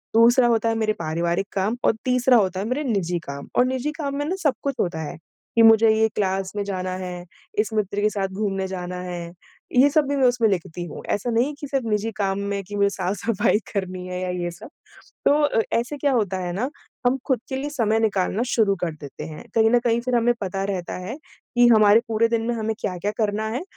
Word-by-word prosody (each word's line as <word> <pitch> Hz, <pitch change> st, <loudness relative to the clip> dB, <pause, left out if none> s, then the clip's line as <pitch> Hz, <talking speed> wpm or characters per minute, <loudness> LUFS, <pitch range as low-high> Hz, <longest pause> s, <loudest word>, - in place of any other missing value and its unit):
दूसरा 240 Hz, +2 st, +6 dB
होता 230 Hz, -1 st, +2 dB
है 225 Hz, -, 0 dB
मेरे 220 Hz, -1 st, +1 dB
पारिवारिक 170 Hz, +4 st, -1 dB
काम, 205 Hz, +5 st, 0 dB
और -, -, +5 dB
तीसरा 250 Hz, 0 st, +4 dB
होता 190 Hz, -3 st, +1 dB
है 195 Hz, -, -2 dB
मेरे 255 Hz, +6 st, -1 dB
निजी 190 Hz, -, -1 dB
काम। 140 Hz, 0 st, -6 dB
और 250 Hz, -, +5 dB
निजी 260 Hz, +3 st, -1 dB
काम 290 Hz, -3 st, -4 dB
में 290 Hz, -, -1 dB
ना 350 Hz, +5 st, -1 dB
सब 290 Hz, -4 st, +3 dB
कुछ 280 Hz, -2 st, -1 dB
होता 160 Hz, -3 st, -1 dB
है, 150 Hz, -, -6 dB, 0.4 s
कि 230 Hz, -, +5 dB
मुझे 225 Hz, 0 st, +7 dB
ये 220 Hz, 0 st, +4 dB
क्लास 190 Hz, -1 st, -1 dB
में 205 Hz, -, -1 dB
जाना 185 Hz, -2 st, -3 dB
है। 180 Hz, -1 st, -6 dB, 0.3 s
इस 215 Hz, 0 st, 0 dB
मित्र 205 Hz, -1 st, -1 dB
के 210 Hz, -, +3 dB
साथ 200 Hz, -2 st, -2 dB
घूमने 195 Hz, -1 st, -2 dB
जाना 180 Hz, -1 st, -5 dB
है, 175 Hz, -1 st, -6 dB, 0.4 s
ये 265 Hz, +3 st, +6 dB
सब 305 Hz, 0 st, +3 dB
भी 285 Hz, -, +1 dB
मैं 265 Hz, -2 st, +4 dB
उसमें 245 Hz, -2 st, +3 dB
लिखती 175 Hz, -2 st, -3 dB
हूँ। 165 Hz, -, -8 dB
ऐसा 225 Hz, +4 st, -1 dB
नहीं 235 Hz, +2 st, +3 dB
है 300 Hz, -, -5 dB
कि 290 Hz, -, -6 dB
सिर्फ़ 270 Hz, -3 st, -1 dB
निजी 210 Hz, +1 st, 0 dB
काम 195 Hz, -1 st, 0 dB
में 200 Hz, 0 st, -2 dB
कि 205 Hz, +2 st, -8 dB
मुझे 200 Hz, 0 st, +3 dB
साफ-सफाई 200 Hz, +3 st, 0 dB
करनी 185 Hz, -2 st, -3 dB
है 180 Hz, 0 st, -4 dB
या 185 Hz, -, -2 dB
ये 175 Hz, -, -2 dB
सब। 175 Hz, -, -11 dB, 0.6 s
तो 290 Hz, -4 st, +3 dB
ए -, -, +3 dB, 0.2 s
ऐसे 250 Hz, +5 st, -4 dB
क्या 285 Hz, 0 st, +1 dB
होता 205 Hz, -6 st, 0 dB
है 180 Hz, -1 st, -3 dB
ना 235 Hz, +9 st, -1 dB, 0.4 s
हम 255 Hz, +2 st, +2 dB
खुद 260 Hz, -5 st, +2 dB
के 265 Hz, -, -2 dB
लिए 285 Hz, +2 st, -3 dB
समय 225 Hz, -6 st, +1 dB
निकालना 205 Hz, 0 st, +1 dB
शुरू 215 Hz, -5 st, +2 dB
कर 175 Hz, -, 0 dB
देते 145 Hz, 0 st, -9 dB
हैं 155 Hz, -1 st, -8 dB
कहीं 225 Hz, -1 st, +5 dB
न 245 Hz, -, +5 dB
कहीं 235 Hz, -1 st, +1 dB
फिर 250 Hz, 0 st, -1 dB
हमें 240 Hz, 0 st, +3 dB
पता 195 Hz, 0 st, -2 dB
रहता 190 Hz, -3 st, -3 dB
है 230 Hz, +7 st, -4 dB, 0.4 s
कि 240 Hz, 0 st, +6 dB
हमारे 215 Hz, -1 st, +7 dB
पूरे 225 Hz, +1 st, +3 dB
दिन 230 Hz, -1 st, +1 dB
में 240 Hz, -, +1 dB
हमें 220 Hz, -1 st, -1 dB
क्या-क्या 185 Hz, +2 st, -2 dB
करना 215 Hz, 0 st, 0 dB
है? 250 Hz, +8 st, -3 dB
215 Hz, 235 wpm, -23 LUFS, 190-240 Hz, 0.6 s, मुझे